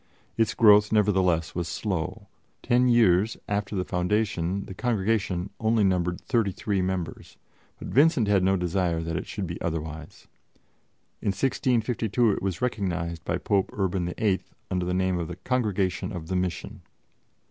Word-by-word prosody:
Its 115 -1 +1
growth, 105 -1 +6
nevertheless, 95 -6 +2
was 85 -1 -2
slow; 90 -3 -3 0.4
ten 125 +1 +3
years 110 -3 +4
after 100 0 -2
the 90 -1 -1
foundation 95 0 -1
the - - -8
Congregation 100 -4 -1
only 110 -1 +2
numbered 90 -2 +1
thirty 115 -6 +1
three 100 +1 -1
members; 90 -3 -4 0.4
but - - -8
Vincent 140 -6 +4
had 100 -2 +3
no 95 +1 +3
desire 90 -2 0
that 80 0 -3
it - - -4
should 100 - -4
be 85 0 -6
otherwise. 80 -2 -5 0.9
In - - -5
1652 115 0 +1
it 95 - -2
was 95 +2 -3
recognized 90 -8 -2
by - - -1
Pope 100 -2 0
Urban 95 -3 -1
VIII 100 -4 +1 0.3
under 90 -1 -1
the 90 - 0
name 95 -1 +1
of 85 - -3
the - - -6
Congregation 105 -7 -1
of 85 -5 -7
the 95 - -1
Mission. 90 +3 -3
95 Hz, 155 wpm, -26 LUFS, 90-110 Hz, 0.9 s, growth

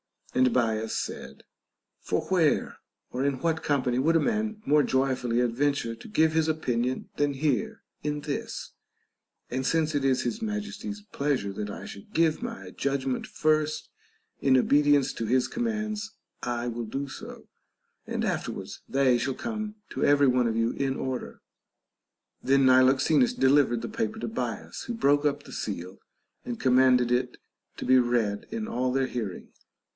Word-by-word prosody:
And 130 -1 +4
Bias 110 -2 0
said: 70 +1 -6 0.6
For - - -1
where 170 -6 +2 0.3
or 130 - -2
in 140 -2 0
what 160 0 0
company 130 -4 +1
would 160 +5 +3
a - - +6
man 215 +1 -1
more 150 +1 +5
joyfully 130 -3 +1
adventure 125 0 0
to 115 - -12
give 160 -6 +3
his 160 -1 +2
opinion 130 -5 -1
than 145 -1 +1
here 135 -5 -1 0.2
in 150 0 -2
this 145 -1 -4 0.8
1 125 - -3
And 130 - -1
since 160 0 +1
it 145 -2 0
is 130 -1 +2
his 215 - -3
Majesty's 210 -1 -4
pleasure 140 -8 0
that 105 +1 -4
I - - -7
should 100 - -11
give 165 +1 +2
my 235 -1 -6
judgment 135 -2 -2
first, 155 0 0 0.5
in 130 -1 +4
obedience 145 +1 +4
to 115 - -3
his 125 +3 +2
commands 220 -2 -2 0.3
I 120 0 -2
will 120 0 -3
do 135 +6 -4
so, - - -9 0.6
and - - -2
afterwards - - -3
they 135 -2 +3
shall 130 +2 -1
come 215 -2 -4
to - - -3
every 145 -1 +5
one 125 -1 +3
of 110 - -1
you 115 +1 +1
in 135 -1 -1
order. 130 -2 -4 1.0
Then 135 0 +3
Niloxenus 130 - +5
delivered 135 - +3
the - - -4
paper 220 0 -2
to - - -3
Bias, 225 - -4
who 240 - -4
broke 145 -7 +3
up 145 - 0
the - - -12
seal 90 +3 -5 0.5
and 120 -1 -4
commanded 125 -1 +4
it 125 0 0 0.4
to - - -5
be 130 0 +6
read 120 -4 0
in 220 -1 -4
all 125 - -1
their 135 0 +1
hear 115 -7 -3
ing. - - -12
135 Hz, 165 wpm, -27 LUFS, 125-160 Hz, 1.0 s, a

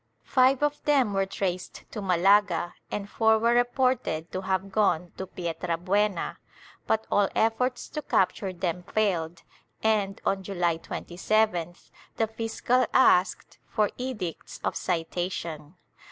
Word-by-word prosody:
Five 260 +1 +3
of 295 0 0
them 270 -8 +3
were 195 0 +1
traced 185 -2 -4
to 210 - -5
Malaga 185 -1 +3 0.2
and 200 -1 -4
four 220 +1 +3
were 230 +2 +2
reported 245 -9 +1
to 185 - -3
have 190 0 -1
gone 180 -4 +1
to 190 - -5
Pietrabuena, 180 +3 -1 0.5
but 220 0 +1
all 205 -1 +3
efforts 240 +3 +1
to 300 - -4
capture 190 -5 +1
them 180 -1 -3
failed 175 -5 -1 0.4
and, 210 -3 +1
on 195 0 +1
July 175 -4 -1
27th, 175 0 -1 0.3
the 225 - +3
fiscal 225 +2 0
asked 190 -8 +3
for 210 -2 +1
edicts 210 -10 -5
of - - -1
citation. 170 -2 -3
195 Hz, 125 wpm, -27 LUFS, 175-220 Hz, 0.5 s, Five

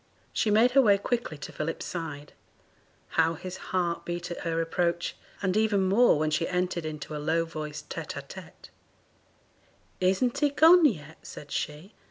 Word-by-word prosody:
She 220 - +1
made 225 +4 +5
her 275 +2 +6
way 205 -5 +5
quickly 230 -6 -2
to 145 - -8
Philip's 165 +2 -4
side; 150 -4 -6 0.8
how 165 +1 +2
his 185 +3 -7
heart 175 -2 -1
beat 175 0 -5
at 175 - -5
her 165 -1 -2
approach! 170 +1 -1 0.3
and 185 0 +1
even 215 -2 +2
more 200 +1 +4
when 155 +1 0
she 155 +2 0
entered 180 -2 -1
into 150 0 -6
a 150 - -4
low 165 +2 +1
voiced 155 -2 -7
tete - - -5
a - - -5
tete. - - -12 1.3
'Isn't 235 +9 +1
he 295 0 +3
gone 320 +4 +6
yet?' 160 - -1
said 145 -1 -10
she. 155 +8 -4
175 Hz, 170 wpm, -28 LUFS, 160-210 Hz, 1.3 s, her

